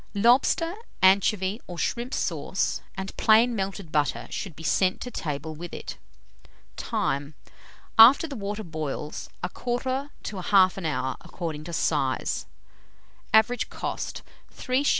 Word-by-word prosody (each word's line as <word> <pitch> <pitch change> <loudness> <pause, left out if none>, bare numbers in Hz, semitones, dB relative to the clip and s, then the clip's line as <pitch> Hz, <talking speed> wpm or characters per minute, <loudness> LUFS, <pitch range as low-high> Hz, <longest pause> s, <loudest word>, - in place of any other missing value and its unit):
Lobster, 250 - +3 0.3
anchovy, 195 +2 +3
or 175 - -7
shrimp 240 - -2
sauce, - - -1 0.2
and 190 0 -5
plain 230 +2 +5
melted 195 -4 -4
butter, 150 -3 0
should 190 -7 -5
be 160 - -10
sent 185 +3 +2
to 250 - -5
table 150 - -4
with 170 +2 -8
it. - - -7 0.8
Time. 140 +2 -2 0.6
After 250 +8 +9
the 285 - -7
water 205 0 -4
boils, 155 -3 -5
1/4 255 +8 -2
to 210 - -5
1/2 185 -1 +3
hour, 130 -3 -2
according 155 -3 -6
to 170 - -7
size. - - 0 0.8
Average 220 +2 +3
cost, - - -4 0.3
3s. 260 +3 -1
195 Hz, 125 wpm, -26 LUFS, 160-235 Hz, 0.8 s, After